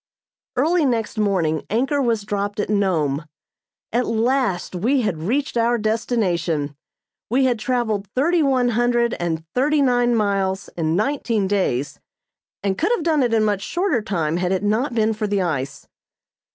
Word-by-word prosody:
Early 320 +6 +2
next 230 -4 -1
morning 175 -7 +1
anchor 270 +6 +1
was 230 -5 0
dropped 205 0 -3
at 205 - -1
Nome. 165 -8 +1 0.7
At 245 +1 +1
last 230 -4 0
we 245 +9 +1
had 205 -8 -1
reached 245 - -1
our 235 +1 +2
destination. 180 - -1 0.5
We 260 +4 +3
had 245 -3 +1
traveled 220 -3 -1
thirty 330 +6 +2
one 260 -4 +2
hundred 240 0 +1
and 165 -2 -2
thirty 290 +4 +2
nine 245 -2 +3
miles 195 -3 0
in 160 -1 0
nineteen 225 -2 0
days 185 -9 -1 0.6
and 195 -1 -1
could - - +1
have 345 - -5
done 315 -3 +2
it 245 -2 +1
in 225 -1 +3
much 205 -2 0
shorter 345 - 0
time 170 -6 -1
had 180 0 -1
it 190 +1 0
not 235 +5 0
been 220 -1 +2
for 215 0 -2
the 200 -2 0
ice. 140 -6 -3
215 Hz, 160 wpm, -21 LUFS, 190-245 Hz, 0.7 s, We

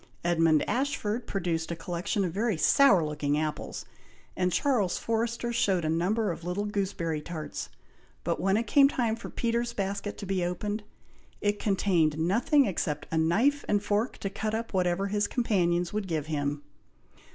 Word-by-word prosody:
Edmund 165 -3 +3
Ashford 240 -2 -1
produced 170 -4 -2
a 170 - -2
collection 180 +4 -2
of 175 - -2
very 215 -1 0
sour 195 - +5
looking 150 -1 -1
apples, 155 0 -3 0.5
and 180 0 +1
Charles 220 - +1
Forrester 230 +1 -1
showed 190 -7 +1
a - - 0
number 190 +7 +1
of 170 - -7
little 180 +4 -2
gooseberry 190 -6 -2
tarts, 160 -1 -6 0.5
but - - -1
when 195 +2 +2
it 230 - 0
became 275 +5 +6
time 235 -5 0
for 230 - -8
Peter's 235 0 -1
basket 200 0 -3
to - - -6
be 190 -2 0
opened, 205 +5 -2 0.6
it 205 0 0
contained 180 -7 +2
nothing 235 - +3
except 155 -7 -2
a 165 - 0
knife 230 - +2
and 205 -1 +1
fork 210 +4 0
to 195 - -4
cut 215 +2 -2
up 225 0 -4
whatever 180 0 +1
his 205 +1 0
companions 180 -7 +1
would 210 -2 -2
give 155 -4 -2
him! 145 -1 -2
195 Hz, 165 wpm, -28 LUFS, 170-220 Hz, 0.6 s, became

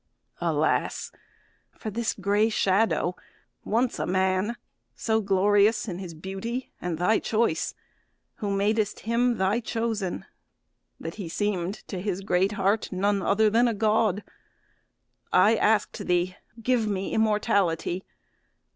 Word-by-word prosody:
Alas! - - 0 0.7
for 215 - -5
this 230 +2 -1
gray 205 +2 +2
shadow, 195 -3 +1 0.5
once 235 +3 0
a - - -1
man 190 +4 +1 0.4
So 220 -1 0
glorious 205 +2 +3
in 180 -3 -4
his 175 -4 -7
beauty 195 +9 -5
and 175 -2 -2
thy 180 +6 +3
choice, 220 -7 0 0.6
Who 205 - -3
madest 205 +2 0
him 235 +1 +1
thy 190 +4 +2
chosen, 225 -5 -2 0.7
that 165 - -6
he 170 - -5
seem'd 195 0 -1
To 185 -3 -5
his 195 -1 -2
great 195 +1 +1
heart 200 +2 0
none 200 +1 +1
other 215 +3 +3
than 235 +3 +4
a 230 - 0
God! 215 -1 +2 1.1
I 205 +5 +5
ask'd 215 -1 +1
thee, 180 +1 +1 0.2
'Give 235 -1 +1
me 195 -2 -2
immortality.' 200 -5 +1
205 Hz, 125 wpm, -26 LUFS, 190-220 Hz, 1.1 s, I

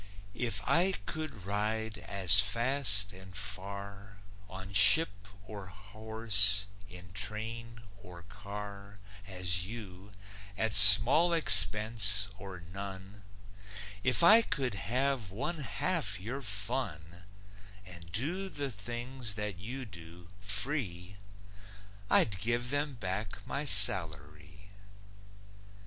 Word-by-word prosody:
If 120 +1 -5
I 185 +3 0
could 155 - -9
ride 110 +2 -5
as 100 0 +2
fast 105 -2 0
and 95 -1 -15
far 100 0 -8 0.3
On 95 +1 -11
ship 100 - +3 0.2
or 105 -3 -12
horse, 105 +1 0 0.2
in 90 -1 -15
train 115 +3 -8 0.2
or 85 -1 -16
car, 100 0 -12 0.3
As 90 -2 -1
you, 100 -3 -11 0.4
at 110 +1 -3
small 135 - +9
expense 105 - +4
or 95 -2 -12
none, 95 +2 -12 0.8
If 130 +8 -1
I 220 +7 +5
could 140 - -5
have 125 +2 -5
one 140 - -7
half 140 - -5
your 120 +9 -9
fun 100 - -6 0.6
And 85 -2 -15
do 170 - -4
the 140 -5 -7
things 120 +1 -6
that 105 -4 -8
you 125 +7 -8
do, 85 -3 -15
free, 100 - -5 0.9
I'd 100 -1 0
give 120 +4 -3
them 145 -1 -4
back 100 -1 -8
my 145 +2 -7
salary. 95 - +2
105 Hz, 105 wpm, -28 LUFS, 95-120 Hz, 0.9 s, small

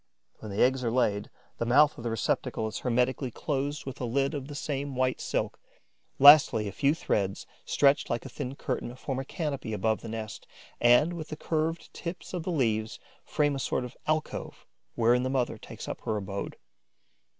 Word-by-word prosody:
When 110 - -8
the 100 - +2
eggs 130 +1 +2
are 120 - +1
laid, 110 -4 +1 0.3
the 115 - 0
mouth 145 +5 +5
of 115 - -9
the 120 - -1
receptacle 115 0 -1
is 110 - -5
hermetically 125 +2 0
closed 145 +3 -3
with 135 -1 -7
a - - -1
lid 135 +5 0
of 140 -3 -4
the 145 - -8
same 140 -1 -3
white 130 0 0
silk. - - -2 0.6
Lastly, 140 -7 +8
a - - -4
few 140 - +2
threads, 100 -10 -1 0.2
stretched 140 0 +3
like 120 - -2
a - - -6
thin 130 +2 -5
curtain, 120 -3 -4
form 130 0 -4
a 135 - -4
canopy 140 -8 -3
above 110 +1 0
the 115 - -7
nest 110 -1 -6 0.3
and, 125 +8 +5
with 165 -2 -6
the 155 - -6
curved 160 +2 -2
tips 175 +2 -7
of 180 - -2
the 170 - -4
leaves, 110 -7 0 0.3
frame 145 -1 +1
a - - -3
sort 130 - -1
of 125 - -10
alcove 155 0 -2 0.3
wherein 120 +1 +4
the 130 - -1
mother 125 -4 -1
takes - - -9
up - - -5
her 110 - -1
abode. 100 -1 -5
130 Hz, 195 wpm, -28 LUFS, 115-145 Hz, 0.6 s, Lastly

